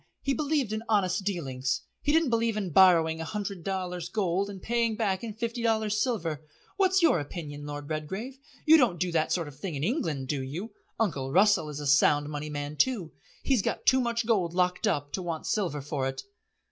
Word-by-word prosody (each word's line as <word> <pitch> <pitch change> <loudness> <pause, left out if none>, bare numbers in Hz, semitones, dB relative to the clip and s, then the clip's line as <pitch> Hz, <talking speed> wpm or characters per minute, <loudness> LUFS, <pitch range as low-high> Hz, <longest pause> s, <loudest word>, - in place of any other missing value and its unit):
He 275 - +1
believed 285 -6 0
in 220 - -2
honest 195 -2 +2
dealings. 135 -9 -2 0.2
He 290 - +1
didn't 320 -4 +3
believe 230 -1 +1
in 195 -4 -2
borrowing 165 -2 +5
a - - -2
hundred 200 0 -5
dollars 180 -2 -3
gold 195 -1 0
and 195 -1 -7
paying 230 +1 0
back 200 -3 -1
in 220 -3 -5
fifty 235 +1 -3
dollars 220 -2 +1
silver. 165 - -1 0.3
What's 380 -2 +3
your 325 - +5
opinion, 145 -1 -7
Lord 145 0 -6
Redgrave; 190 - -5 0.3
you 320 +1 +8
don't 230 - +2
do 180 0 0
that 160 -2 +1
sort 170 -4 0
of 140 -2 -12
thing 175 -3 -4
in 140 - -3
England, 160 - -1
do 140 0 -1
you? 165 +12 -5 0.3
Uncle 145 -12 -1
Russell 190 -3 +4
is 150 -1 -6
a 145 - -5
Sound 145 +1 +4
Money 150 0 -5
man 145 0 -5
too. 210 - +1 0.3
He's 260 -6 +2
got - - -3
too 260 -1 +5
much 235 -1 -1
gold 185 -7 +1
locked 180 0 +1
up 145 0 -1
to 190 - -2
want 170 -3 -4
silver 175 -9 -1
for 140 -2 -2
it." 135 - -5
185 Hz, 205 wpm, -28 LUFS, 150-225 Hz, 0.3 s, you